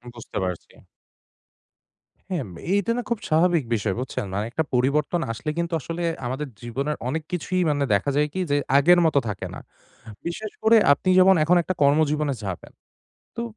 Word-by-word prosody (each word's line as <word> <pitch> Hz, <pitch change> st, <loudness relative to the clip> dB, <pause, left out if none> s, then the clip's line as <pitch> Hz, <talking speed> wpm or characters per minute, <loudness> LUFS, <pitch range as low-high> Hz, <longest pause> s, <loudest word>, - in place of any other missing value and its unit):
বুঝতে 115 Hz, -, -8 dB
পারছি। 90 Hz, -2 st, -5 dB, 1.6 s
হ্যাঁ, 170 Hz, -7 st, -1 dB
ম -, -, -11 dB, 0.2 s
এইটা 200 Hz, +2 st, +1 dB
না -, -, 0 dB
খুব 235 Hz, -3 st, -1 dB
স্বাভাবিক 165 Hz, 0 st, +3 dB
বিষয়, 105 Hz, -3 st, -1 dB
বুঝছেন? 130 Hz, -2 st, -4 dB
মানে 100 Hz, +2 st, -1 dB
একটা 160 Hz, -, 0 dB
পরিবর্তন 140 Hz, +7 st, +1 dB
আসলে 115 Hz, +7 st, -5 dB
কিন্তু 170 Hz, 0 st, -2 dB
আসলে, 165 Hz, +4 st, -5 dB, 0.2 s
আমাদের 135 Hz, +5 st, -3 dB
জীবনের 135 Hz, +6 st, -3 dB
অনেক 155 Hz, +5 st, -2 dB
কিছুই 180 Hz, +1 st, -1 dB
মানে, 145 Hz, -1 st, +1 dB
দেখা 100 Hz, +8 st, +1 dB
যায় 150 Hz, +1 st, +2 dB
কি? -, -, -3 dB
যে, 145 Hz, -, +3 dB, 0.2 s
আগের 175 Hz, +5 st, +6 dB
মতো 155 Hz, -3 st, +3 dB
থাকে 105 Hz, -3 st, -4 dB
না। -, -, -7 dB, 0.7 s
বিশেষ 205 Hz, +5 st, -5 dB
করে 225 Hz, +1 st, +6 dB, 0.2 s
আপনি 185 Hz, -, -2 dB
যেমন 190 Hz, +1 st, +6 dB
এখন 175 Hz, +3 st, +4 dB
একটা 185 Hz, -, -2 dB
কর্মজীবনে 150 Hz, 0 st, +2 dB
যাবেন। 95 Hz, -3 st, -6 dB, 0.7 s
তো 235 Hz, -, -2 dB
150 Hz, 170 wpm, -24 LUFS, 130-175 Hz, 1.6 s, আগের